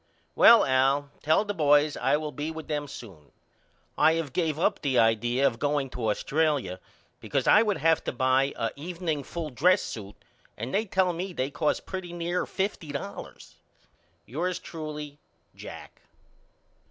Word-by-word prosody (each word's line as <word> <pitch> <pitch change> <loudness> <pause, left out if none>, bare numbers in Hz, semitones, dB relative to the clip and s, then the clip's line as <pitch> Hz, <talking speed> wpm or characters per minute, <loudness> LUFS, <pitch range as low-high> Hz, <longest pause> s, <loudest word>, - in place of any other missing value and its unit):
Well 230 0 +7
Al 135 +2 +2
tell 160 +7 +2
the 205 - -2
boys 145 -3 +3
I - - +2
will 150 0 -4
be 150 +2 -4
with 160 -1 -7
them 145 -1 -2
soon. 90 - -11 0.7
I 160 - +6
have 165 -5 -3
gave 160 -4 0
up 165 - +1
the 135 -3 0
idea 120 +4 +3
of 120 -4 +1
going 145 -2 0
to 115 -3 -2
Australia 140 - 0 0.4
because - - -2
I 210 - +6
would 210 -3 +1
have 160 0 +2
to - - -1
buy 130 +2 +2
a 115 - -2
evening 165 -1 -3
full 165 -1 -5
dress 175 +9 +3
suit 105 -2 -7 0.4
and 115 +4 -5
they 215 +3 +1
tell 190 -3 +1
me 180 +2 -5
they 135 -2 -2
cost 150 +1 -1
pretty 185 -2 -6
near 175 +1 -2
fifty 190 -6 -3
dollars. 130 -8 -8 0.7
Yours 175 +8 -2
truly, 150 -2 -7 0.4
JACK. - - -11
150 Hz, 160 wpm, -27 LUFS, 130-170 Hz, 0.7 s, Well